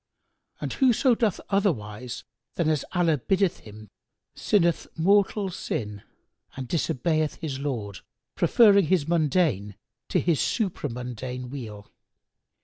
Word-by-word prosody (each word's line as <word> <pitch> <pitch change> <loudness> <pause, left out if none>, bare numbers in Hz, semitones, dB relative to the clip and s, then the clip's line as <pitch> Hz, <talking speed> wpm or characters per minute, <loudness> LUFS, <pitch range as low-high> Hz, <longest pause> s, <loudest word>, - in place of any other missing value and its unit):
And - - -4
whoso 255 -1 +3
doth 220 -5 0
otherwise 125 - -1 0.3
than 170 - 0
as 155 -3 +1
Allah 170 -5 +2
biddeth 190 - +1
him 110 0 -12 0.5
sinneth 170 -5 +1
mortal 200 +3 +2
sin 105 - -4 0.6
and 130 -2 -5
disobeyeth 155 0 0
his 145 -5 -5
Lord, 115 -9 -4 0.3
preferring 200 -6 +5
his 165 -4 +2
mundane 155 - +1 0.3
to - - +2
his 165 -4 +1
supra 190 - -1
mundane 125 +1 -6
weal. 110 -7 -8
155 Hz, 115 wpm, -26 LUFS, 125-185 Hz, 0.6 s, preferring